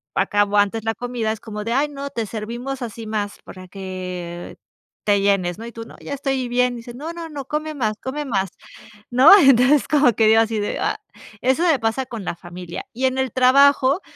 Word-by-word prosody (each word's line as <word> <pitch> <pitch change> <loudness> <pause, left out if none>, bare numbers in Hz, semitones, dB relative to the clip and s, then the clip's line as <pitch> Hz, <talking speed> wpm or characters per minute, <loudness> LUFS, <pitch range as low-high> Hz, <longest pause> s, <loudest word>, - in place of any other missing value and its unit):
acabo 205 0 +1
antes 205 +2 +2
la 225 0 0
comida, 240 -1 -2
es 220 - -10
como 210 -2 -6
de: 230 - -1
"A, 280 +4 +2
no, 280 -1 -6
te 230 -4 -3
servimos 235 +6 -5
así 230 -1 -6
más 210 -1 -3
para 185 0 -11
que 180 -2 -7 0.5
te 205 -1 +3
llenes", 195 -3 +1
¿no?, 225 - -7
y 235 - -9
tú: 230 - -7
"No, - - -14
ya - - -7
estoy 270 -2 -2
bien", 245 0 +1
dice: 235 +1 -9
"No, 295 +7 -6
no, 340 -1 -7
no, 290 -4 -7
come 310 +2 -3
más, 215 -6 -1
come 285 +3 -4
más", 195 -8 -1 0.6
¿no? 255 +7 +7
Entonces 270 -1 +5
como 290 -4 +4
que 220 +1 +3
digo 220 +1 +6
así 225 -1 -1
de: 205 - -2
"Ah", - - -1 0.4
eso 260 +6 +2
me 325 -6 +3
pasa 225 +4 -1
con 230 -6 -7
la - - -3
familia 175 0 -8
y 255 +3 -1
en 260 0 +1
el 265 -2 -1
trabajo, 275 +4 +4
235 Hz, 210 wpm, -21 LUFS, 205-270 Hz, 0.6 s, no